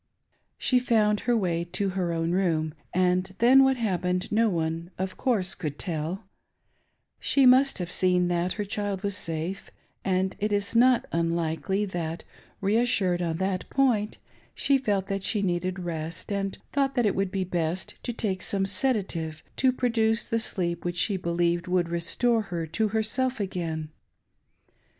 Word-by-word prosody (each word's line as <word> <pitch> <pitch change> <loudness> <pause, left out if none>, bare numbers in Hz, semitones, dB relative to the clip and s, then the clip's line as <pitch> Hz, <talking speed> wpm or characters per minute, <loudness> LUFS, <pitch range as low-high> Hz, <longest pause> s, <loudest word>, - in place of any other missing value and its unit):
She 255 - +3
found 215 -4 +2
her 240 - +4
way 170 -5 0
to 180 +3 -2
her 185 -2 -1
own 165 0 -1
room, 165 -4 +1 0.2
and 185 +1 +1
then 260 +3 +7
what 265 -1 +3
hap 205 -7 -1
pened 180 +1 -1
no 225 +1 +3
one, 165 -1 -2
of 185 0 -3
course, 210 -8 0
could 150 -5 -5
teL 175 +3 -3 1.0
She 275 -2 +3
must 260 +2 +5
have 180 -2 -4
seen 180 -1 +2
that 175 +1 0
her 210 - -3
child 205 -1 -3
was 200 -1 +1
safe; 165 +2 -2 0.3
and 190 0 0
it 210 +1 -1
is 205 +2 -1
not 245 +1 +5
unlikely 170 +4 0
that, 170 -3 -4 0.4
reassured 200 -4 +2
on 165 -2 -1
that 190 0 -2
point, 235 -6 +1 0.4
she 275 -1 +2
felt 205 -6 0
that 195 0 -3
she 205 +1 +1
needed 180 0 -1
rest, 165 0 -5
and 195 -1 -2 0.2
thought 275 -1 +1
that 245 -3 +2
it 205 - +2
would 195 -1 0
be 190 0 -1
best 175 0 -2
to 245 - -3
take 195 -5 -2
some 195 +1 -1
sedative 190 -7 -1
to 260 -1 +4
produce 230 -3 +1
the 230 - 0
sleep 170 -6 -2
which 175 0 -3
she 200 +3 +1
believed 170 0 0
would 180 -1 +1
restore 220 +8 +1
her 175 -5 -4
to 170 +8 0
herself 230 +4 -1
again. 165 -5 -3
190 Hz, 165 wpm, -27 LUFS, 175-220 Hz, 1.0 s, then